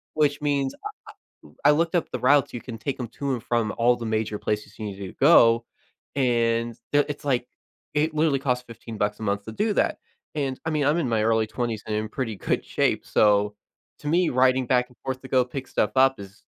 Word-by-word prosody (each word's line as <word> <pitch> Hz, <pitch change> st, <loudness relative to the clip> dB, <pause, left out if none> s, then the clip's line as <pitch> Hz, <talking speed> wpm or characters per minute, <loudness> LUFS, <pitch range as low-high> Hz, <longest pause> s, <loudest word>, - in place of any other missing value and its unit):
Which 150 Hz, -1 st, +1 dB
means, 140 Hz, -2 st, 0 dB, 0.7 s
I -, -, -14 dB, 0.2 s
I -, -, +8 dB
I -, -, +6 dB
looked 165 Hz, +3 st, +1 dB
up 175 Hz, -, 0 dB
the -, -, -3 dB
routes, 140 Hz, +1 st, +3 dB
you 120 Hz, -, -4 dB
can 115 Hz, -3 st, -7 dB
take 130 Hz, +5 st, -4 dB
'em 125 Hz, -3 st, -4 dB
to 140 Hz, +4 st, -3 dB
and 120 Hz, -, -5 dB
from 120 Hz, -3 st, 0 dB
all 120 Hz, +1 st, +4 dB
the 115 Hz, -, -6 dB
major 110 Hz, -1 st, -1 dB
places 105 Hz, 0 st, -3 dB
you 110 Hz, -, -4 dB
needed 100 Hz, -1 st, -6 dB
to -, -, -10 dB
go, 115 Hz, -6 st, +6 dB, 0.5 s
and 115 Hz, -3 st, +1 dB, 0.2 s
they'll 145 Hz, 0 st, +4 dB
it's 145 Hz, +1 st, -6 dB
like, 125 Hz, -4 st, 0 dB, 0.5 s
it 155 Hz, +1 st, +1 dB
literally 155 Hz, -2 st, +2 dB
costs 125 Hz, -2 st, -1 dB
15 115 Hz, -1 st, -9 dB
bucks 105 Hz, 0 st, -1 dB
a -, -, -7 dB
month 100 Hz, -1 st, -1 dB
to 110 Hz, -, -7 dB
do 210 Hz, -, 0 dB
that, -, -, +1 dB, 0.4 s
and 135 Hz, -3 st, -2 dB
I -, -, -1 dB
mean, 150 Hz, -2 st, 0 dB
I'm 145 Hz, +3 st, +3 dB
in 155 Hz, -7 st, 0 dB
my 110 Hz, -2 st, +1 dB
early 110 Hz, 0 st, +2 dB
20s 110 Hz, -1 st, -3 dB
and 110 Hz, -, -2 dB
I'm 110 Hz, -, -1 dB
in -, -, -6 dB
pretty 115 Hz, -2 st, -4 dB
good -, -, -1 dB
shape, -, -, 0 dB
so, 105 Hz, 0 st, +3 dB, 0.4 s
to -, -, -11 dB
me, 175 Hz, +2 st, +3 dB
riding 130 Hz, 0 st, +3 dB
back 125 Hz, 0 st, +2 dB
and 125 Hz, -, -22 dB
forth 130 Hz, -1 st, -3 dB
to 130 Hz, -, -10 dB
go 130 Hz, -1 st, +3 dB
pick 130 Hz, +1 st, -6 dB
stuff 105 Hz, -, 0 dB
up 135 Hz, -2 st, +4 dB
is 100 Hz, 0 st, -12 dB
125 Hz, 235 wpm, -25 LUFS, 110-140 Hz, 0.7 s, I